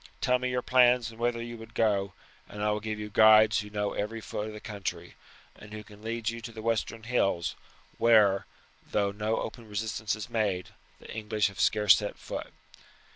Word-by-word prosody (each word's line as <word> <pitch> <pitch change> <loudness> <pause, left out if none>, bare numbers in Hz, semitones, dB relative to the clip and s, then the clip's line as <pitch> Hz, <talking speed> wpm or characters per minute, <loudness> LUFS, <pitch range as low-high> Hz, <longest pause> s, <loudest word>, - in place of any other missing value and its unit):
Tell 125 - +2
me 125 0 -1
your 125 0 -1
plans 125 -2 +4
and 115 - -15
whither 120 0 0
you 120 0 -7
would 115 0 -12
go; 100 -3 +1 0.4
and 105 +1 -6
I 105 - +2
will 105 - -1
give 110 0 -4
you 105 0 -6
guides 110 +1 +6
who 105 - -6
know 105 -1 -2
every 110 +2 -3
foot 105 -1 -5
of 110 - -7
the 105 - -8
country, 105 -3 -6 0.4
and 105 0 -13
who 105 0 -7
can 105 0 -16
lead 115 0 -4
you 115 +1 -2
to 115 - -7
the 110 -1 -9
western 115 0 -1
hills, 100 -7 0 0.4
where, 105 -4 +5 0.4
though 100 -1 +1
no 105 +2 -1
open 115 -3 -6
resistance 105 0 -2
is 105 -1 -7
made, 100 -5 -1 0.3
the - - -11
English 105 -1 0
have 100 - -13
scarce 105 -3 +5
set 105 - -4
foot. - - -6
110 Hz, 200 wpm, -29 LUFS, 105-115 Hz, 0.4 s, guides